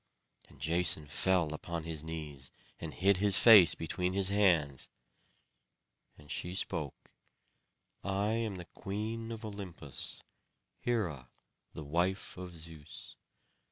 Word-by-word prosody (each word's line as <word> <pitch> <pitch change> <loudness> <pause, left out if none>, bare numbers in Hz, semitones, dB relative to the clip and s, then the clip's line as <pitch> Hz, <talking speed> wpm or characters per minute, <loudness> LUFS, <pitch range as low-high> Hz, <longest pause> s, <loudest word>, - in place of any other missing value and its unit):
And - - -18
Jason 85 -2 +3
fell 85 +1 +1
upon 85 +1 -5
his 80 -2 -3
knees, 75 -5 -6 0.3
and - - -5
hid 100 0 +3
his 100 0 +4
face 105 -8 +9
between 90 +3 -2
his 95 -1 +3
hands. 85 -10 +2 1.3
And 75 +1 -13
she 90 +1 -4
spoke: 75 -6 -4 0.9
"I 100 +2 0
am 110 -3 -1
the 90 - -8
Queen 110 +5 -5
of 115 0 -6
Olympus, 95 - -7 0.6
Hera 85 - -2 0.4
the 80 - -7
wife 85 +6 -1
of 90 -1 -8
Zeus. 80 -2 -10
90 Hz, 120 wpm, -32 LUFS, 80-100 Hz, 1.3 s, face